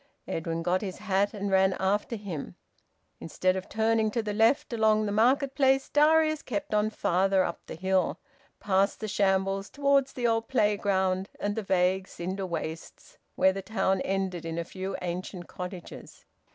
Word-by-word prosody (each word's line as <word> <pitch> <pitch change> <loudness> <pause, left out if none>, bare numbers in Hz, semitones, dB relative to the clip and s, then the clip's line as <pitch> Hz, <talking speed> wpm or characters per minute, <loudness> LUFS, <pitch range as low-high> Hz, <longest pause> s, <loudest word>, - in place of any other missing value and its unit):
Edwin 165 0 -3
got 180 +2 +1
his 190 -3 -5
hat 200 0 0
and 200 -1 -4
ran 190 0 +4
after 205 +5 -1
him. 195 -9 -6 0.6
Instead 185 +3 0
of 190 0 -5
turning 220 0 +1
to 230 +1 -2
the 210 -1 -3
left 225 +4 +2
along 215 -1 +3
the 205 - -2
market 260 +6 +2
place, 270 -1 +2
Darius 310 +1 +4
kept 210 -3 -4
on 210 0 +2
farther 190 -2 +2
up 170 - -3
the - - -7
hill, 190 +2 0 0.4
past 195 0 +1
the 215 - -4
Shambles, 195 -1 0
towards 280 -1 +2
the 245 - -3
old 225 -1 +1
playground 195 -5 +1
and 205 0 -2
the 220 - -2
vague 190 -1 +1
cinder 185 +2 -4
wastes 165 -1 -7 0.2
where 190 0 +4
the 195 - -4
town 190 -2 0
ended 190 -3 -2
in 165 0 -4
a 170 - -1
few 190 +2 -5
ancient 180 0 -5
cottages. 180 -1 -9
195 Hz, 165 wpm, -28 LUFS, 185-220 Hz, 0.6 s, ran